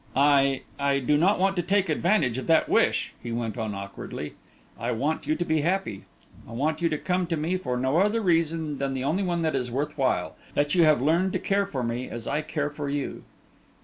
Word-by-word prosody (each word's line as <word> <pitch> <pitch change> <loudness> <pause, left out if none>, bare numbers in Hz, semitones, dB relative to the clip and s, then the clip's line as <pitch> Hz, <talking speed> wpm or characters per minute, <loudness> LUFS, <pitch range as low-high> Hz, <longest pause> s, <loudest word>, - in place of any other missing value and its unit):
"I 140 -1 +4 0.2
I 140 0 +2
do 140 +2 +1
not 180 +7 +3
want 195 +1 +2
to - - +3
take 195 +2 +1
advantage 155 - +1
of - - -7
that 165 -1 +4
wish," - - +2
he 120 - -6
went 115 -1 -2
on 110 -4 -3
awkwardly. 100 -6 -7 0.5
"I - - -1
want 145 +5 -2
you 155 - +2
to 175 - -2
be 160 -2 +1
happy. 175 - -1 0.4
I - - -9
want 155 +6 -1
you 170 - +2
to 155 - -1
come 180 +2 -1
to 165 -1 -1
me 160 +4 -1
for 125 -9 -2
no 130 +4 +1
other 210 +5 +3
reason 165 -6 0
than 135 -1 -1
the 130 - -2
only 165 +8 0
one 175 -3 -1
that 155 -3 0
is 125 -2 -1
worth 140 +4 -3
while; 125 -9 0 0.2
that 145 0 +1
you 175 -3 +5
have 150 -5 +4
learned 170 +6 +2
to - - 0
care 200 0 +1
for 135 -9 -3
me 120 +2 -2
as 120 -1 -6
I 150 +2 -1
care 150 -1 -3
for 145 -1 -4
you." 145 -1 -3
150 Hz, 230 wpm, -26 LUFS, 130-170 Hz, 0.5 s, you